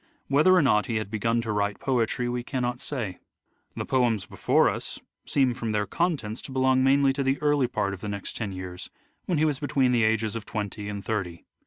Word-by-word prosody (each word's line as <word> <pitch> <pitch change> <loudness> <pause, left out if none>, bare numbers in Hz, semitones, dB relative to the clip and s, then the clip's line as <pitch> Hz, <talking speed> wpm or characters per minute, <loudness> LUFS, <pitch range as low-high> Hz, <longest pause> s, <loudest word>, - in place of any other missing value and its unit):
Whether 155 +7 +5
or 180 - +5
not 105 -5 +3
he 115 - -2
had 110 -2 -2
begun 115 +2 +1
to 115 -2 -3
write 105 -1 0
poetry 125 -1 0
we 120 0 -2
cannot 125 -1 -2
say. 115 -12 -3 0.6
The - - -3
poems 120 -7 +1
before - - +2
us - - -3 0.3
seem 130 -3 +2
from 115 -2 -3
their 105 0 +1
contents 135 - -1
to - - -9
belong 130 0 +3
mainly 135 0 +4
to 140 - -2
the 135 0 +1
early 145 -3 +2
part 100 -4 -1
of 95 - -8
the 105 - -4
next 100 -1 -5
ten 105 -4 -3
years, 90 -1 -7 0.4
when 175 - +1
he 155 - +3
was 145 -3 0
between 135 -3 +2
the 120 -2 +3
ages 110 0 +1
of 115 - -4
twenty 105 -1 -4
and 100 -2 -6
thirty. 95 -6 -3
120 Hz, 215 wpm, -26 LUFS, 105-135 Hz, 0.6 s, Whether